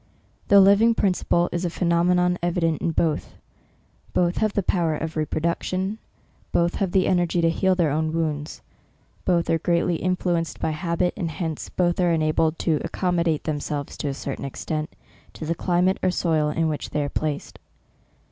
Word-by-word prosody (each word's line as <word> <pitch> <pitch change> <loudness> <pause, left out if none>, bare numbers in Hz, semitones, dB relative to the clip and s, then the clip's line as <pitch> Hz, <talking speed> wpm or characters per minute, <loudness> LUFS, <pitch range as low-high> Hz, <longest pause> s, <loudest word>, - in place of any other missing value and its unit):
The 200 - +7
living 200 +4 +5
principle 180 -3 +1
is 175 +1 -2
a 175 - 0
phe 170 - -5
nomenon 180 +1 +2
evident 170 -2 0
in 170 - 0
both; 160 -1 -1 0.8
both 175 0 +1
have 215 -2 +1
the 200 - 0
power 170 -3 +1
of 160 +1 -4
re 155 -1 0
production; 185 +6 -2 0.5
both 170 0 +2
have 190 -3 -1
the 185 0 +3
ener 175 -2 +2
gy 175 - -1
to 165 0 +3
heal 190 +3 +2
their 170 -5 +2
own 155 +2 0
wounds; 155 -2 -3 0.6
both 175 -2 +2
are 165 - +2
great 170 +1 +1
ly 175 - +1
influenced 180 -2 -1
by - - -1
habit, 170 +2 -1
and 175 -5 -3
hence 160 0 -4
both 175 -1 0
ace 175 -2 +3
enabled 155 +1 +1
to 160 -3 0
accommodate 170 -4 0
themselves 145 -2 -3
to - - -3
a 135 - -2
certain 140 0 -5
extent, 155 +3 -4 0.4
to 160 - -7
the 165 - 0
climate 180 +2 +1
or - - +2
soil 160 -4 +1
in 160 +2 0
which 150 -2 -3
they 150 - -1
are - - -2
placed. 150 0 -3
170 Hz, 185 wpm, -24 LUFS, 155-180 Hz, 0.8 s, The